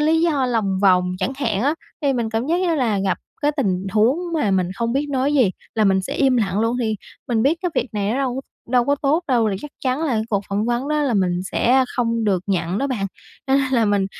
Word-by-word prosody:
lý 320 +2 +3
do 295 -6 +2
lòng 205 -6 0
vòng 180 -2 +4
chẳng 200 +7 -1
hạn 225 -6 -1
á. 290 +4 +2 0.3
Thì 280 -1 +2
mình 235 -3 -1
cảm 225 +4 -1
giác 345 +3 +1
như 345 -3 +1
là 230 -8 +1
gặp 195 -1 0 0.2
cái 295 - +3
tình 195 -7 0
huống 225 +7 +3 0.2
mà 225 -10 +1
mình 185 -2 +1
không 235 +2 -1
biết 285 +2 0
nói 275 +2 +1
gì 250 -9 +4 0.2
là 215 -1 +2
mình 190 -1 +3
sẽ - - -5
im 265 -2 +3
lặng 200 -2 0
luôn, 230 +2 +1
thì 220 -2 0 0.3
mình 225 -2 +1
biết 315 +5 +2
cái 360 - 0
việc - - 0
này 205 0 -1
nó - - -1
đâu 265 -1 -1 0.3
đâu 245 -1 +3
có 285 - +2
tốt 290 +4 +1
đâu, 235 -4 +3
thì 195 - -2
chắc 295 - -7
chắn 260 +5 0
là 275 - 0
cái 220 - +1
cuộc 200 -3 +1
phỏng 200 +2 -1
vấn 240 +4 -1
đó 300 0 +1
là 265 -5 +1
mình 180 -3 +1
sẽ 260 +2 +3
không 230 -2 0
được 190 -4 +1
nhận 180 -1 -1
đó 275 - 0
bạn, 220 -7 -2 0.4
cho 265 - +2
nên 265 -1 +1
là 230 -3 +3
mình 200 -2 +2
235 Hz, 260 wpm, -21 LUFS, 200-275 Hz, 0.4 s, vòng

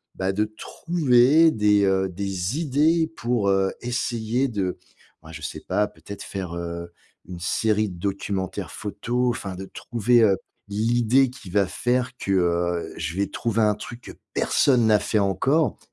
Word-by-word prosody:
bah, 95 0 -1
de 105 +2 +1
trouver 145 +5 +3
des, 105 -4 +3
heu, 95 0 +2
des 95 - -3
idées 160 +2 +2
pour, 120 -4 0
heu, 95 0 +2
essayer 120 0 -1
de, 100 -7 -2 0.5
bah, 80 - -12
je - - -8
sais - - -5
pas 105 0 0
peut-être 95 +5 -10
faire, 95 -3 -5
heu, 85 0 -5 0.4
une 90 -1 -8
série 105 +3 +1
de 90 -2 -10
documentaires 95 -1 -3
photo, 120 +4 -2
enfin 100 -5 -4
de 95 +1 -7
trouver, 120 +4 +1
heu, 100 -3 +4 0.3
l'idée 120 +5 +2
qui 120 -7 -12
va 100 +1 +2
faire 125 +3 -1
que, 100 - -3
heu, 85 -2 0
je 80 +1 -4
vais 100 - +1
trouver 115 -1 -1
un 105 -1 +3
truc 120 +3 -9
que - - -10 0.2
personne 125 -5 +3
n'a 105 -2 +5
fait 110 - 0
encore. 130 +8 +1
105 Hz, 160 wpm, -24 LUFS, 95-120 Hz, 0.5 s, n'a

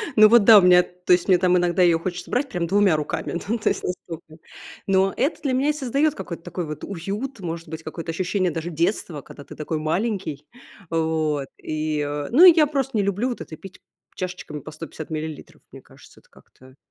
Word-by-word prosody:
Ну, 215 -1 +8
вот 235 -1 +6
да, 215 0 +9
у - - +3
меня 180 -1 +6
то 180 0 0
есть, 175 0 +2
мне 185 -2 +5
там 180 0 +3
иногда 175 +1 +1
её 170 -2 +4
хочется 180 +1 -5
брать 265 +3 0
прям 175 -8 -2
2 195 -2 +3
руками, 155 +3 -3
ну, 230 +3 0
то 215 - 0
есть, - - -3
настолько. 165 -3 -7 0.5
Но 195 0 +2
это 295 +4 0
для 275 -4 -1
меня 265 +3 +1
и - - +2
создаёт 285 +1 0
какой-то 175 -3 -7
такой 175 0 -5
вот 150 -1 -7
уют, 205 +8 -5
может 170 -2 -6
быть, 160 0 -7
какое-то 165 0 -7
ощущение 185 +2 -1
даже 165 +2 -4
детства, 165 -2 -2
когда 145 - -13
ты - - -12
такой 155 +1 -3
маленький. 165 -2 -2 0.4
Вот, 160 -3 -1
и, 155 0 -3
э, 145 0 -3
ну 310 +10 +8
и 360 - +11
я 310 -3 +5
просто 270 -4 -2
не 205 - +2
люблю 200 +6 -1
вот 245 - -5
это 155 - -8
пить 190 +2 -13 0.4
чашечками 180 -5 -6
по - - -10
150 155 0 -9
миллилитров. 155 -1 -7
Мне - - -12
кажется, - - -19
это - - -29
как-то 130 0 -20
180 Hz, 215 wpm, -23 LUFS, 160-205 Hz, 0.5 s, и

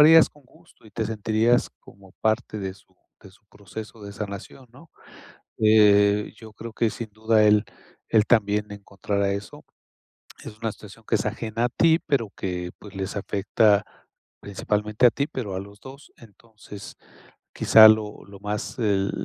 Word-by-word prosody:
harías 160 +2 +8
con 150 - -23
gusto 160 0 -24
y 110 - -16
te 110 +2 -3
sentirías 110 +2 +1
como 95 -1 -18
parte 110 0 -1
de 95 -1 -5
su 100 - -25 0.2
de 95 - -15
su 105 +2 -26
proceso 105 +2 -11
de 100 0 -8
sanación, 100 +5 -8
¿no? 160 +5 -17 0.7
Eh, 105 -1 +4
yo 110 -1 -14
creo 115 -1 -9
que 115 +1 +1
sin 115 -2 -7
duda 110 +1 +2
él 105 0 +4 0.4
él 110 -1 +3
también 105 -2 +1
encontrará 100 0 -3
eso. 100 +1 -7 0.8
Es 105 - -10
una 115 -1 -2
situación 110 +2 -15
que 115 - +2
es 105 - -1
ajena 110 +2 -2
a - - -1
ti, 165 +6 +3
pero 115 -7 0
que 90 -1 -4
pues 105 -1 -13
les 95 +1 -4
afecta, 105 +1 +1 0.6
principalmente 105 +3 -1
a - - +9
ti, 140 +1 -2
pero 105 -7 -5
a - - -3
los 100 +1 -14
2. 135 +4 -13
Entonces, 105 -2 -13 0.6
quizá 110 -1 +8
lo 110 -1 +1
lo 100 -1 -14
más 105 +4 -5
el 100 -3 +1
105 Hz, 165 wpm, -24 LUFS, 100-115 Hz, 0.8 s, a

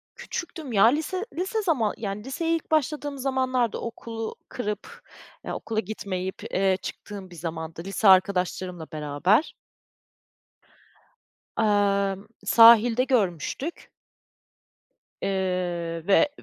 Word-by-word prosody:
Küçüktüm 320 -6 -6
ya, 200 0 +5
lise 320 - +1
lise 380 +5 -1
zaman, 260 - +1
yani, 210 -1 -4
liseye 325 +6 -1
ilk 320 - -6
başladığım 295 -1 0
zamanlardı, 260 -3 0
okulu 225 -1 -6
kırıp, 210 -4 -5 0.4
ya - - -4
okula 220 -1 -3
gitmeyip, 190 -3 -4
ııı, 190 -1 +3
çıktığım 195 -1 -8
bir 175 - -13
zamandı, 165 0 -6
lise 195 +2 0
arkadaşlarımla 185 -3 +3
beraber. 155 - +1 2.0
Emm, 200 -2 +1 0.2
sahilde 230 +2 +7
görmüştük. 245 - -1 1.3
Eee 180 -3 -2
ve 245 +9 +5
210 Hz, 100 wpm, -26 LUFS, 185-260 Hz, 2.0 s, sahilde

